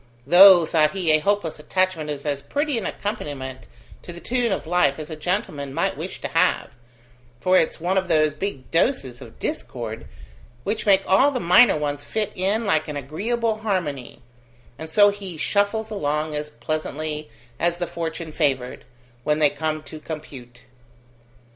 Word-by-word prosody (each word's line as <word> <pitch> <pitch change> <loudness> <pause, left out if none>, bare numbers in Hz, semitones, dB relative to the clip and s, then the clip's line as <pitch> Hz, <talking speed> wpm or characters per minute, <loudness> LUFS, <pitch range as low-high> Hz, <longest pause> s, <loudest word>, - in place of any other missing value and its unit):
"Though," 175 +2 +8
thought 155 0 +2
he, 180 -5 +1
"a 155 - +5
hopeless 200 -3 -1
attachment 185 -1 -1
is 145 -1 -5
as 140 -2 -1
pretty 290 - -1
an 210 - -4
accompaniment 145 -10 -5 0.3
to - - -9
the 175 - -9
tune 240 +2 -1
of 190 - -2
life 160 -5 +2
as 155 0 -7
a - - -4
gentleman 155 -5 -3
might - - 0
wish - - -6
to - - -3
have, - - +1 0.7
for 185 +6 +2
it's 165 - +2
one 185 +3 +1
of 190 - -5
those 155 -3 +3
big 150 -5 -5
doses 165 - 0
of - - -12
discord - - -5 0.6
which 215 +1 -3
make 195 -1 +5
all 200 +10 +5
the 270 - -2
minor 180 +4 +6
ones 145 -1 -3
fit 215 -2 -2
in 200 +5 0
like 160 -6 +1
an 150 -1 -4
agreeable 215 - -2
harmony, 150 - -3 0.6
and 160 0 -7
so 205 +5 +6
he 195 -4 -7
shuffles 205 +6 0
along 150 -5 -1
as 150 0 -4
pleasantly 155 -2 -4 0.3
as 170 +1 +1
the 175 - -2
fortune 165 -1 -5
favoured, 130 -4 -1 0.4
when 150 +2 +1
they 150 -2 +4
come 155 +1 -3
to 155 - -10
compute!" 135 -6 -9
165 Hz, 165 wpm, -23 LUFS, 150-200 Hz, 0.7 s, Though